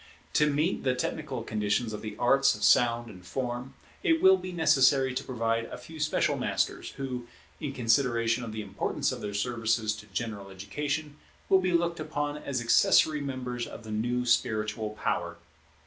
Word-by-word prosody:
To 150 Hz, 0 st, +4 dB
meet 155 Hz, +6 st, 0 dB
the 130 Hz, -1 st, +1 dB
technical 130 Hz, -1 st, -3 dB
conditions 110 Hz, +1 st, -1 dB
of 105 Hz, -, -5 dB
the 105 Hz, -1 st, -6 dB
arts 135 Hz, +3 st, +4 dB
of -, -, -7 dB
sound 120 Hz, -1 st, +4 dB
and 95 Hz, -5 st, -12 dB
form, 125 Hz, +5 st, -4 dB, 0.3 s
it 325 Hz, -4 st, +3 dB
will 190 Hz, -6 st, +7 dB
be 185 Hz, 0 st, -6 dB
necessary 135 Hz, -5 st, +4 dB
to 135 Hz, +2 st, -3 dB
provide 115 Hz, -2 st, -1 dB
a -, -, -8 dB
few 155 Hz, +6 st, -11 dB
special 150 Hz, +1 st, +1 dB
masters, -, -, -1 dB
who, 125 Hz, -3 st, -5 dB, 0.3 s
in 145 Hz, -3 st, -3 dB
consideration 120 Hz, -1 st, +2 dB
of 115 Hz, -, -5 dB
the 110 Hz, 0 st, -4 dB
importance 100 Hz, -, -1 dB
of -, -, -6 dB
their 105 Hz, -1 st, -4 dB
services 115 Hz, -1 st, 0 dB
to 110 Hz, -, -12 dB
general 100 Hz, -1 st, -4 dB
education, 145 Hz, +10 st, -4 dB, 0.3 s
will 190 Hz, -1 st, +5 dB
be 185 Hz, 0 st, 0 dB
looked 170 Hz, -1 st, +1 dB
upon 150 Hz, -1 st, -3 dB
as 135 Hz, -4 st, -3 dB
accessory 135 Hz, +6 st, +4 dB
members 125 Hz, -3 st, -4 dB
of -, -, -10 dB
the 110 Hz, -, -8 dB
new 120 Hz, +3 st, -1 dB
spiritual 110 Hz, -2 st, +1 dB
power. 85 Hz, -1 st, -1 dB
125 Hz, 175 wpm, -28 LUFS, 110-145 Hz, 0.3 s, will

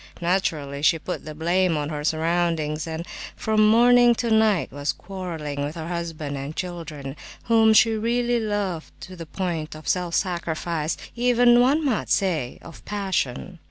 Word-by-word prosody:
Naturally, 160 Hz, -6 st, -1 dB
she 165 Hz, +2 st, +4 dB
put 155 Hz, -, -6 dB
the 155 Hz, -1 st, -7 dB
blame 170 Hz, +1 st, +1 dB
on 145 Hz, 0 st, -2 dB
her 150 Hz, -1 st, -4 dB
surroundings, 160 Hz, -1 st, 0 dB
and 160 Hz, +1 st, -5 dB, 0.3 s
from 215 Hz, -1 st, +3 dB
morning 240 Hz, +1 st, +6 dB
to 235 Hz, -1 st, -2 dB
night 220 Hz, -5 st, +3 dB
was 145 Hz, +2 st, -2 dB
quarrelling 165 Hz, -7 st, -5 dB
with 145 Hz, +3 st, -4 dB
her 165 Hz, 0 st, -6 dB
husband 165 Hz, -4 st, -4 dB
and 140 Hz, +3 st, -6 dB
children, 160 Hz, -6 st, -6 dB, 0.3 s
whom 225 Hz, -1 st, +4 dB
she 220 Hz, +1 st, +6 dB
really 235 Hz, +2 st, 0 dB
loved 205 Hz, -6 st, -2 dB
to 185 Hz, -, -9 dB
the 165 Hz, -2 st, -9 dB
point 165 Hz, -4 st, -3 dB
of 155 Hz, -, -11 dB
self 180 Hz, -3 st, 0 dB
sacrifice, 170 Hz, -3 st, -2 dB, 0.2 s
even, 245 Hz, 0 st, +4 dB
one 280 Hz, +6 st, +3 dB
might 250 Hz, -6 st, 0 dB
say, 160 Hz, -10 st, 0 dB
of 165 Hz, -, -12 dB
passion. 185 Hz, -5 st, -3 dB
175 Hz, 160 wpm, -24 LUFS, 155-215 Hz, 0.3 s, morning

